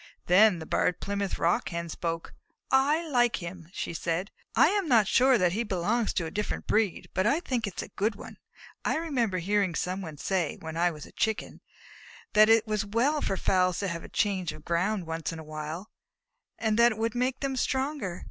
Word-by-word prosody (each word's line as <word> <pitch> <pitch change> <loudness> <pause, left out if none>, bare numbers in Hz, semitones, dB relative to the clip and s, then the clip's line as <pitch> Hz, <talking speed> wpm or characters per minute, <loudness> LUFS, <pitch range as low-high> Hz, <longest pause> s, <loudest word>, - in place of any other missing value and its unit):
Then 195 +1 +6
the 160 - -7
Barred 175 - +1
Plymouth 200 -1 -2
Rock 170 +1 +1
Hen 170 0 -4
spoke. 165 0 -4 0.4
"I 295 +5 +3
like 245 -5 +3
him," 170 -2 -8
she 180 - -4
said. 170 +4 -2 0.2
"I - - +6
am 300 - +3
sure 260 +5 +4
that 180 -4 +2
he 210 +6 -1
belongs 210 +3 0
to 170 - -1
a 160 - -5
different 210 +3 -3
breed, 215 -4 0
but 185 +3 +1
I 285 +7 +3
think 245 -9 -2
it 195 - -8
is - - -2
a - - -9
good 210 +2 -1
one. - - -11 0.5
I - - +1
remember 250 - 0
hearing 190 0 +1
somebody 180 -4 -3
say, 175 -1 -1
when 160 0 -7
I 175 +1 +3
was 155 -3 -8
a - - -15
Chicken, 220 -1 -2 0.7
that 215 +1 +7
it 225 0 +5
was 215 -2 -1
well 240 +9 +1
for 195 - -1
fowls 185 -2 +2
to 200 - -1
have 170 0 -5
a - - -10
change 190 -5 0
of 155 0 -13
ground 180 +3 0
once 165 0 -3
in 165 - -7
a 160 - -8
while, 155 +6 -6 0.7
and 220 0 0
that 235 0 +6
it - - -11
would 225 0 -1
make 250 +1 -1
them 275 -1 -1
stronger. 265 - -1
200 Hz, 205 wpm, -28 LUFS, 170-230 Hz, 0.7 s, that